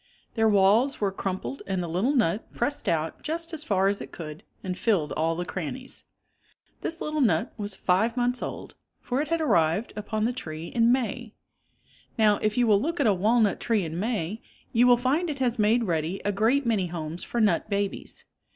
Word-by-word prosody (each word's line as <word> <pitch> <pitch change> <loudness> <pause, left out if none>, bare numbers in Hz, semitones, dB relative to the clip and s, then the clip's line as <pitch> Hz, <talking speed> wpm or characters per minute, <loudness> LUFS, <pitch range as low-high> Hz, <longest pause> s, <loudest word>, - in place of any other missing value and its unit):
Their 225 -1 +3
walls 210 +7 +4
were 200 -2 +1
crumpled 190 +7 -4
and 190 -2 -1
the - - -4
little 195 - 0
nut 215 -4 +1
press 285 +5 -1
ed - - -2
out 160 -1 -2
just 330 +2 -3
as 310 -1 -1
far 195 -7 +2
as 200 0 0
it - - -8
could 155 0 -8 0.2
and 185 -2 -3
filled 185 -8 +1
all 165 +1 0
the 175 +1 -3
crannies. 195 - -5 0.8
This 330 - -3
little 305 0 -1
nut 185 -11 +2
was 205 -3 -4
five 220 +7 +1
months 245 0 0
old, - - -6 0.3
for 255 +3 -1
it 300 - -3
had 330 +2 0
arrived 170 - +2
upon 215 +1 -2
the 245 - 0 2.2
you 245 - +3
will 205 -2 +4
look 335 +3 -2
at 285 - +3
a 210 - +5
walnut 215 +3 +2
tree 220 -6 +1
in 160 +2 -4
May, 215 -2 -2 0.3
you 240 +2 +5
will 245 -1 +6
find 285 +8 0
it 290 - -3
has 250 -3 0
made 220 +3 +3
ready 170 -1 -1
a 205 - +2
great 230 +7 +2
many 210 -6 +1
homes 165 0 -5
for 240 - -3
nut 210 -3 +2
babies. 200 -1 -3
215 Hz, 190 wpm, -26 LUFS, 185-245 Hz, 2.2 s, will